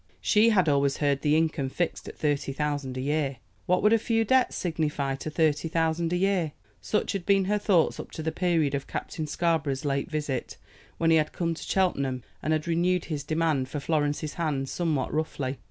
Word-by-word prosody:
She 215 Hz, +2 st, +4 dB
had 190 Hz, -6 st, +3 dB
always 140 Hz, -1 st, +2 dB
heard 140 Hz, -2 st, +1 dB
the 150 Hz, 0 st, +3 dB
income 160 Hz, -4 st, 0 dB
fixed 175 Hz, +5 st, -2 dB
at -, -, -9 dB
thirty 145 Hz, -3 st, 0 dB
thousand 145 Hz, -2 st, -2 dB
a -, -, -2 dB
year. 140 Hz, -1 st, -1 dB, 0.3 s
What 180 Hz, +1 st, +2 dB
would 210 Hz, +1 st, +5 dB
a 230 Hz, -, +4 dB
few 225 Hz, 0 st, +1 dB
debts 260 Hz, +3 st, +3 dB
signify 150 Hz, -5 st, -1 dB
to 155 Hz, -, -5 dB
thirty 155 Hz, 0 st, +1 dB
thousand 165 Hz, +1 st, 0 dB
a -, -, +1 dB
year? 180 Hz, -4 st, +1 dB, 0.3 s
Such 210 Hz, -, 0 dB
had 195 Hz, -3 st, -3 dB
been 195 Hz, 0 st, +3 dB
her 210 Hz, +2 st, +1 dB
thoughts 185 Hz, -5 st, +2 dB
up -, -, -6 dB
to 160 Hz, -, -5 dB
the 160 Hz, -, -1 dB
period 165 Hz, -4 st, +1 dB
of 140 Hz, -1 st, -3 dB
Captain 155 Hz, -2 st, -4 dB
Scarborough's 150 Hz, -4 st, 0 dB
late 140 Hz, +1 st, -1 dB
visit, 150 Hz, -5 st, -3 dB, 0.4 s
when 165 Hz, 0 st, +2 dB
he 160 Hz, -, +6 dB
had 155 Hz, -1 st, 0 dB
come 170 Hz, -1 st, -1 dB
to 165 Hz, -, -9 dB
Cheltenham, 140 Hz, -10 st, 0 dB, 0.2 s
and 155 Hz, -, -1 dB
had 155 Hz, +1 st, 0 dB
renewed 175 Hz, +1 st, +1 dB
his 150 Hz, -4 st, -4 dB
demand 155 Hz, -4 st, 0 dB
for 145 Hz, -, -3 dB
Florence's 150 Hz, 0 st, -1 dB
hand 145 Hz, -5 st, -2 dB
somewhat 160 Hz, -7 st, -1 dB
roughly. 140 Hz, -4 st, -2 dB
155 Hz, 200 wpm, -27 LUFS, 145-175 Hz, 0.4 s, he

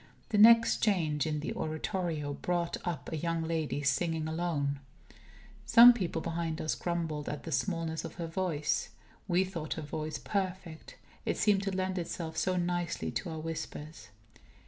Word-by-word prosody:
The 210 Hz, -, +2 dB
next 230 Hz, +1 st, +7 dB
change 160 Hz, -, +1 dB
in 150 Hz, -1 st, -1 dB
the -, -, -3 dB
Oratorio 155 Hz, -2 st, -2 dB
brought 175 Hz, +3 st, -1 dB
up 155 Hz, -8 st, -3 dB
a -, -, -1 dB
young 165 Hz, +1 st, -1 dB
lady, 160 Hz, -3 st, -2 dB
singing 155 Hz, +3 st, +1 dB
alone. 160 Hz, -4 st, -1 dB, 0.9 s
Some 240 Hz, +1 st, +10 dB
people 180 Hz, -7 st, -2 dB
behind 165 Hz, -1 st, -2 dB
us 155 Hz, -, 0 dB
grumbled 165 Hz, -4 st, -2 dB
at 150 Hz, -, -5 dB
the 165 Hz, -, -6 dB
smallness 165 Hz, -3 st, -1 dB
of -, -, -7 dB
her 170 Hz, -, -4 dB
voice. 165 Hz, -3 st, -1 dB, 0.4 s
We 180 Hz, 0 st, +3 dB
thought 170 Hz, -5 st, -4 dB
her 160 Hz, -, -5 dB
voice 155 Hz, +1 st, -4 dB
perfect. 185 Hz, -4 st, -4 dB, 0.3 s
It -, -, -1 dB
seemed 205 Hz, -2 st, +3 dB
to 195 Hz, 0 st, -2 dB
lend 185 Hz, 0 st, -1 dB
itself 165 Hz, -1 st, -4 dB
so 185 Hz, +3 st, +1 dB
nicely 175 Hz, -1 st, -1 dB
to 180 Hz, -, -3 dB
our 160 Hz, -1 st, -5 dB
whispers. 155 Hz, -5 st, -6 dB
165 Hz, 160 wpm, -31 LUFS, 155-180 Hz, 0.9 s, Some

